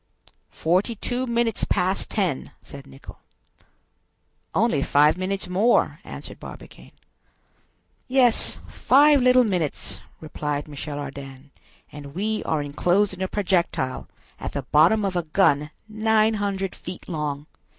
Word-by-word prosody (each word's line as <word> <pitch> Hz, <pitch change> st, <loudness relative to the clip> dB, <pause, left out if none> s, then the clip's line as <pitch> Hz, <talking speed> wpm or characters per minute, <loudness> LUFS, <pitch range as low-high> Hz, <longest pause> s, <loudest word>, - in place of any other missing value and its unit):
"Forty 185 Hz, +8 st, +1 dB
two 250 Hz, +4 st, -3 dB
minutes 235 Hz, -1 st, 0 dB
past 185 Hz, 0 st, 0 dB
ten!" 185 Hz, -, -1 dB
said 140 Hz, -1 st, -12 dB
Nicholl. 135 Hz, -, -13 dB, 1.4 s
"Only 215 Hz, -9 st, +2 dB
five 150 Hz, +2 st, +4 dB
minutes 185 Hz, +1 st, -2 dB
more!" 200 Hz, +7 st, +2 dB
answered -, -, -8 dB
Barbicane. -, -, -12 dB, 1.1 s
"Yes, 255 Hz, -3 st, +3 dB
five 285 Hz, +1 st, +4 dB
little 250 Hz, 0 st, +5 dB
minutes!" 180 Hz, -, -2 dB, 0.2 s
replied 150 Hz, -1 st, -4 dB
Michel 145 Hz, 0 st, -6 dB
Ardan; 135 Hz, -1 st, -8 dB, 0.4 s
"and 145 Hz, 0 st, -10 dB
we 215 Hz, +3 st, -1 dB
are 155 Hz, -2 st, 0 dB
enclosed 180 Hz, +8 st, +1 dB
in 185 Hz, -, -9 dB
a 190 Hz, -, 0 dB
projectile, 180 Hz, -10 st, -1 dB, 0.3 s
at -, -, -5 dB
the 140 Hz, -, -3 dB
bottom 170 Hz, +11 st, +4 dB
of 190 Hz, -2 st, -2 dB
a 175 Hz, -, +1 dB
gun 155 Hz, -3 st, +2 dB, 0.2 s
900 215 Hz, -3 st, +1 dB
feet 180 Hz, 0 st, -9 dB
long! 150 Hz, -4 st, -3 dB
185 Hz, 120 wpm, -24 LUFS, 150-215 Hz, 1.4 s, little